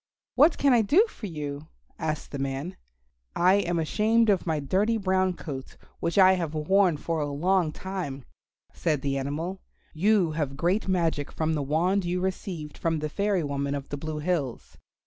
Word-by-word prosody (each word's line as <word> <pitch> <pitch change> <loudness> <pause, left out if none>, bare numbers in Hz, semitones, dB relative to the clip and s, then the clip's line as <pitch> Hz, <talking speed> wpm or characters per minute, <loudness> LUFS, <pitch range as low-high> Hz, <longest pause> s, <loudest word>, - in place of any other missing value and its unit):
"What 300 +5 +5
can 280 -2 +4
I 235 - +5
do 320 - +4
for 225 - -8
you?" 150 -3 -6 0.3
asked 155 -1 -3
the 140 - -5
man. 135 +6 -3 0.6
"I 180 +2 +4
am 175 -4 0
ashamed 215 +7 +2
of 190 -2 0
my 160 -2 +1
dirty 195 +11 +1
brown 190 -2 +1
coat, 140 -6 -8 0.2
which 170 - -2
I 190 -1 +7
have 165 -4 -2
worn 180 +2 +3
for 165 +2 -2
a 145 - -1
long 170 +3 +1
time," 150 -7 -5 0.5
said 150 -4 -1
the 140 -1 0
animal; 160 +8 -4 0.3
"you 190 0 +3
have 145 -3 -3
great 180 +7 +1
magic 165 -6 0
from 160 0 -1
the 150 - -1
wand 170 +8 +1
you 175 +1 -1
received 180 -4 -4
from 165 -1 0
the 155 0 -3
fairy 200 0 0
woman 140 0 -2
of 140 -1 -6
the - - -3
Blue 155 +1 -5
Hills. 150 -6 -2
165 Hz, 180 wpm, -27 LUFS, 150-190 Hz, 0.6 s, I